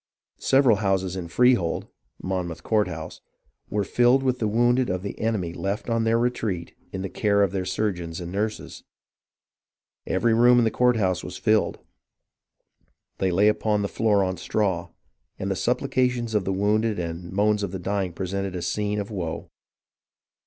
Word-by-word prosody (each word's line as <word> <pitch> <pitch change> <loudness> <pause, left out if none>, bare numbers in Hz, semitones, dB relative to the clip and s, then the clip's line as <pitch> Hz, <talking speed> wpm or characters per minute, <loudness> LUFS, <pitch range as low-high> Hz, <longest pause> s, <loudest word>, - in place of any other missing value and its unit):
Several 135 -5 +4
houses 95 -3 0
in 90 -2 -5
Freehold 120 -3 +2 0.4
(Mon 90 -1 -2
mouth 85 0 -8
Courthouse) 90 -8 -1 0.5
were 105 +1 0
filled 120 +6 +3
with 130 -1 0
the 110 - 0
wounded 120 +3 +2
of 90 0 -2
the 100 - -6
enemy 105 -7 -1
left 100 +6 -3
on 115 0 +1
their 115 +1 +3
retreat 110 -8 -2 0.2
in 95 - -4
the - - -2
care 100 +1 +2
of 100 - +1
their 95 -1 -2
surgeons 90 -6 -2
and 85 -1 -6
nurses. 105 +3 -4 1.2
Every 115 -1 +2
room 120 +2 +6
in 120 - +5
the 110 - +2
courthouse 105 -8 +2
was 90 - -7
filled. 110 0 +2 1.4
They 95 - +1
lay 100 +4 +4
on 105 -1 0
the - - 0
floor 105 -2 +2
on 95 -1 -2
straw, 90 -1 -1 0.5
and - - -3
the - - 0
supplications 125 -3 0
of 105 -3 +1
the 95 - 0
wounded 105 +3 +1
and 85 0 -5
moans 105 +2 +2
of 100 - -2
the 95 - -5
dying 95 0 -2
presented 95 +2 -3
a 90 - -4
scene 105 +2 -1
of 100 +1 -5
woe. 85 -5 -5
100 Hz, 165 wpm, -25 LUFS, 90-110 Hz, 1.4 s, room